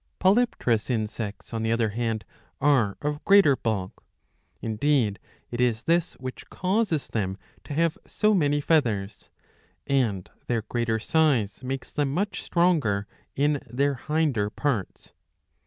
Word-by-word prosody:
Polypterous 190 - +2
insects 110 -3 -3
on 115 - -2
the 110 0 0
other 115 -1 +2
hand 110 -1 -2 0.3
are 130 -8 +3
of 150 0 -2
greater 195 -8 +6
bulk 105 -7 -3 0.3
— - - -43
indeed 115 -2 +1 0.3
it 120 0 -2
is 120 -3 +1
this 170 +1 +1
which 130 0 -8
causes 185 - 0
them 95 -3 -2 0.3
to 145 - -6
have 165 0 +1
so 215 0 +2
many 145 -6 +2
feathers 115 -10 0 0.3
— - - -34 0.2
and 115 -9 0 0.2
their 115 -3 0
greater 115 -1 -1
size 125 -5 +1
makes 130 0 -4
them 145 -2 0
much 195 +7 -1
stronger 150 - +2 0.3
in 145 0 +1
their 140 +4 +1
hinder 140 -6 0
parts. 115 -5 -3
130 Hz, 140 wpm, -26 LUFS, 110-150 Hz, 0.3 s, greater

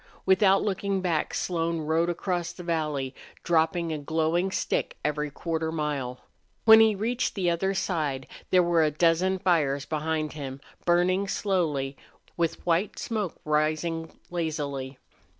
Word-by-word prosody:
Without 190 +1 +4
looking 200 -1 -1
back, 170 -4 0
Slone 165 -2 -1
rode 160 +3 +1
across 175 -1 -2
the 180 - -9
valley, 150 -6 -1 0.3
dropping 165 0 +1
a 155 - -3
glowing 160 +5 0
stick - - -1
every 150 0 0
quarter 160 +2 -3
of 160 - -3
a - - -3
mile. 140 -5 -2 0.4
When 220 0 +10
he 220 -1 +5
reached 235 +5 -1
the 180 -4 +1
other 190 +3 0
side 150 -9 -1 0.2
there 180 -1 +5
were 170 -2 +3
a 155 - +3
dozen 170 +5 +2
fires 150 -6 +1
behind 155 -1 -2
him, 135 -3 -6 0.3
burning 180 +3 +3
slowly, 155 -10 -1 0.4
with 165 -2 -1
white 175 +4 +1
smoke 215 -7 -3
rising 155 +2 0
lazily. 145 -6 -3
165 Hz, 145 wpm, -27 LUFS, 150-185 Hz, 0.4 s, When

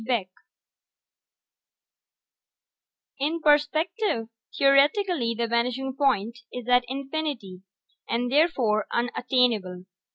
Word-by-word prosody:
BECK 225 -6 -1 2.9
_In 315 +4 0
perspective, 300 - +1 0.3
theoretically 275 - +3
the 235 - 0
vanishing 250 +3 -1
point 235 -5 0
is 250 -1 -7
at 250 0 +4
infinity, 270 -8 -5 0.5
and 245 +1 -1
therefore 260 -9 +2
unattainable. 235 -6 0
250 Hz, 75 wpm, -25 LUFS, 230-290 Hz, 2.9 s, at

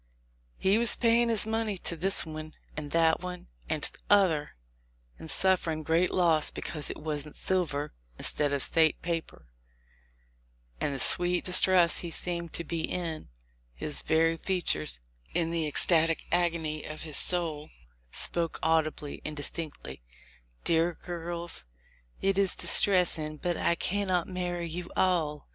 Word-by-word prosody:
"He 195 +3 +3
was 235 -1 +2
paying 235 0 +3
his 220 -3 +1
money 220 -2 -1
to 170 - -2
this 190 +3 0
one, 155 0 -8 0.2
and 150 -1 -5
that 165 +1 +3
one, 180 0 -8 0.2
and - - -2
t'other 190 -7 +2 0.8
one, - - -28
and 160 - -7
sufferin' 170 -4 0
great 165 +4 +2
loss 165 -4 +2
because 150 -3 -3
it - - -6
wasn't 150 -1 -5
silver 155 -6 -1 0.2
instead 145 -1 +4
of 140 -2 +2
State 160 -1 +2
paper; 165 - -4 1.3
and - - 0
the 140 - -3
sweet 175 +5 +1
distress 180 -1 +4
he 175 - -4
seemed 170 0 -2
to 170 - -2
be 165 0 -3
in, 165 - -4 0.2
— - - -39
his 150 - -3
very 165 +1 +2
feat 185 0 -2
ures, 75 -6 -1 0.4
in 165 -1 0
the 165 -2 -1
ecstatic 165 +2 +2
agony 165 -3 0
of 155 0 -7
his 155 -3 0
soul, 160 -4 +4 0.4
spoke 170 -1 -1
audibly 155 -2 0
and 150 0 -6
distinctly, 145 - -6 0.6
'Dear 165 +1 +1
girls, 170 - -5 0.6
it 195 0 +2
is 195 -2 +1
distressing, 165 -6 +2
but 175 +2 -2
I 170 - +1
cannot 185 -2 -1
marry 175 -2 -3
you 175 +2 -6
all. 160 -5 +1
165 Hz, 145 wpm, -29 LUFS, 155-180 Hz, 1.3 s, instead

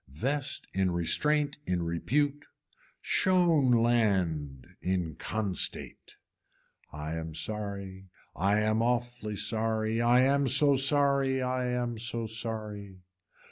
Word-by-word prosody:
Vest 135 - -3
in 95 -1 +1
restraint 145 - +1
in 90 -1 0
repute. 140 - -1 0.6
Shown 175 -8 +3
land 95 - +1 0.2
in 90 -3 -1
constate. 100 +3 -4 0.8
I 75 +1 -5
am 80 -1 -6
sorry 100 +1 -4 0.3
I 100 +4 +2
am 110 +1 +1
awfully 120 -2 -1
sorry, 110 +1 -1
I 120 +2 +5
am 140 +1 +3
so 140 +3 +4
sorry, 140 0 +2
I 125 0 -1
am 120 -2 -2
so 115 0 -3
sorry. 105 -4 -5
110 Hz, 105 wpm, -29 LUFS, 95-130 Hz, 0.8 s, I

